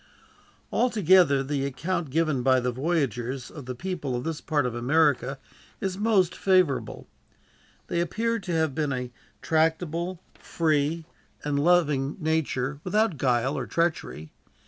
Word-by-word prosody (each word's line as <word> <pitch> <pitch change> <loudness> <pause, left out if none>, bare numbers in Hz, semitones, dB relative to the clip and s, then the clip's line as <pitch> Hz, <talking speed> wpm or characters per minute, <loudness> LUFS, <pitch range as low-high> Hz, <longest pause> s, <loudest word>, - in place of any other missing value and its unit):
Altogether, 185 - +4
the 140 0 -2
account 165 +4 -2
given 155 -2 +1
by 130 0 +4
the 125 0 -1
voyagers 130 -3 -2
of 140 -5 -10
the 125 - -4
people 160 -5 -3
of 120 - -3
this 165 -1 -4
part 150 -4 0
of 125 - -2
America 135 +1 +2 0.4
is 190 -1 -2
most 195 -4 +2
favorable 185 -8 +1 0.8
They 170 - -2
appear 230 +7 -1
to 185 - -6
have 160 -3 +1
been 150 0 -1
of 130 - -1
a 125 -1 -5 0.3
tractable, 165 +2 0
free, 155 0 -1 0.4
and 145 -1 0
loving 150 -5 +2
nature, 150 -4 -1
without 210 -2 +1
guile 130 +1 +1
or - - -3
treachery. 165 - -2
155 Hz, 140 wpm, -26 LUFS, 135-175 Hz, 0.8 s, Altogether